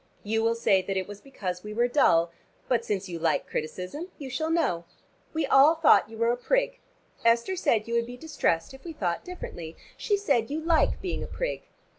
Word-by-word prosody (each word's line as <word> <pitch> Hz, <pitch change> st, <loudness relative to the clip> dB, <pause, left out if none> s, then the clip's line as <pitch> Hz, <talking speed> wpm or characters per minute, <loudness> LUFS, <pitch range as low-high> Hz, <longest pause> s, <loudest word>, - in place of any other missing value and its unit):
You 225 Hz, +2 st, 0 dB
will 230 Hz, +1 st, +2 dB
say 200 Hz, -5 st, +3 dB
that 195 Hz, +1 st, -3 dB
it 185 Hz, -, -2 dB
was 205 Hz, 0 st, -9 dB
because 185 Hz, -10 st, -5 dB
we 210 Hz, 0 st, -7 dB
were 240 Hz, +2 st, +3 dB
dull. 170 Hz, -, +3 dB, 0.4 s
But 235 Hz, -2 st, +1 dB
since 195 Hz, -3 st, -2 dB
you 170 Hz, -2 st, -5 dB
like -, -, +1 dB
criticism 185 Hz, -, -5 dB
you 270 Hz, -3 st, -7 dB
shall 315 Hz, +4 st, -1 dB
know. 290 Hz, -, +1 dB, 0.5 s
We 320 Hz, -, 0 dB
all 285 Hz, +4 st, +6 dB
thought 320 Hz, -8 st, +5 dB
you 225 Hz, -, -10 dB
were 230 Hz, +1 st, +2 dB
a 245 Hz, -, -1 dB
prig. -, -, 0 dB, 0.4 s
Esther 235 Hz, +11 st, +3 dB
said 240 Hz, -, +1 dB
you 235 Hz, -, -4 dB
would 235 Hz, 0 st, +1 dB
be 245 Hz, 0 st, -8 dB
distressed 245 Hz, -, -1 dB
if 265 Hz, -, -13 dB
we 335 Hz, -, -7 dB
thought 175 Hz, -, -2 dB
differently. 175 Hz, -, -8 dB, 0.2 s
She 410 Hz, -, +1 dB
said 275 Hz, -, +1 dB
you 300 Hz, +2 st, -2 dB
like 325 Hz, +3 st, +2 dB
being 365 Hz, -, -2 dB
a -, -, -5 dB
prig. -, -, -4 dB
235 Hz, 210 wpm, -27 LUFS, 195-320 Hz, 0.5 s, all